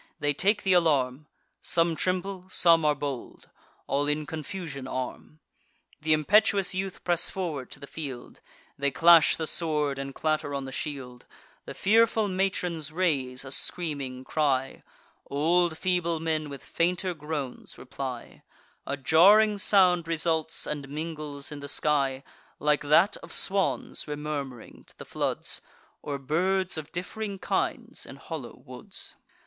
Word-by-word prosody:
They 145 0 +1
take 205 +7 +2
th' 190 - +3
alarm: 150 -5 +2 0.3
Some 165 -1 +1
tremble, 185 +1 -2
some 165 -3 +4
are 150 -1 +4
bold; 140 -3 -6 0.3
all 145 +1 0
in 150 +1 0
confusion 160 -4 -6
arm. 130 +4 -5 0.6
Th' 155 - -11
impetuous 190 +5 +4
youth 190 0 -4
press 175 -1 +2
forward 160 -9 -4
to - - -10
the 140 - -8
field; 140 -4 -7 0.4
They 140 0 +2
clash 165 +3 +6
the 160 - -2
sword, 150 -4 0
and 135 0 -5
clatter 155 -2 -1
on 140 -1 -3
the 135 - -7
shield: 130 -4 -6 0.4
The - - -7
fearful 220 +1 +3
matrons 180 -5 -1
raise 140 -7 0
a 135 - -8
screaming 140 -5 -2
cry; 135 -2 0 0.5
Old 165 +3 +2
feeble 175 -3 0
men 155 -2 -1
with 140 -2 -8
fainter 180 +2 0
groans 150 -4 -6
reply; 130 -2 -7 0.5
A 140 - -2
jarring 200 - +6
sound 180 -4 +4
results, 160 -1 0
and 145 -2 -4
mingles 150 -1 -5
in 150 - -6
the 140 0 -7
sky, 140 -3 0 0.3
Like 150 0 +2
that 155 +7 +4
of - - -12
swans 195 0 0
remurm'ring 145 -5 -5
to - - -20
the - - -9
floods, - - -2 0.4
Or 145 -1 -3
birds 180 +7 0
of 155 -2 -6
diff'ring 200 +3 -4
kinds - - -2
in - - -9
hollow - - -8
woods. - - -9
155 Hz, 140 wpm, -27 LUFS, 140-180 Hz, 0.6 s, clash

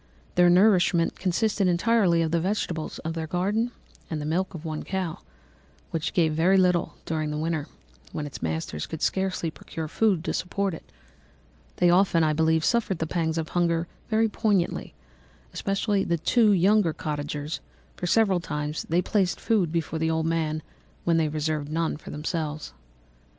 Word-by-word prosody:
Their 175 0 +5
nourishment 180 -2 +4
consisted 195 +2 +1
entirely 180 -1 +3
of 160 - -1
the 170 - +2
vegetables 175 -3 -2
of 160 - -2
their 160 -1 -4
garden 200 +8 0 0.4
and 160 - -3
the 150 - -4
milk 180 +4 -1
of 165 0 -8
one 155 -1 -3
cow, 190 -4 -3 0.7
which 165 0 -2
gave 160 -3 +2
very 175 +5 +4
little 180 -2 +2
during 155 -2 -2
the 150 - -3
winter, 155 -1 -2 0.4
when 150 - -4
its 145 - -8
masters 80 -1 -3
could 160 - -6
scarcely 190 -4 0
procure 160 +1 -7
food 190 0 +1
to - - -2
support 195 +1 -1
it. 160 - -10 0.8
They 175 -1 +4
often, 175 -2 +4
I 155 -1 +2
believe, 160 +1 +2
suffered 235 -6 +1
the 160 - -1
pangs 160 -1 -1
of 160 -1 -2
hunger 170 -1 +1 0.2
very 225 0 +3
poignantly, 205 -4 0 0.6
especially 195 0 0
the 170 - 0
two 215 +7 +3
younger 195 -2 +4
cottagers, 150 0 -4 0.4
for 175 - -4
several 195 -2 +3
times 150 -2 -4
they 175 +3 +2
placed 190 -4 +1
food 200 -8 +1
before 165 -1 -2
the 160 0 +1
old 160 0 0
man 155 -2 -1 0.4
when 170 -1 +2
they 160 -1 +2
reserved 155 -1 -2
none 165 0 0
for 150 - -11
themselves. 155 0 -4
165 Hz, 165 wpm, -26 LUFS, 155-190 Hz, 0.8 s, Their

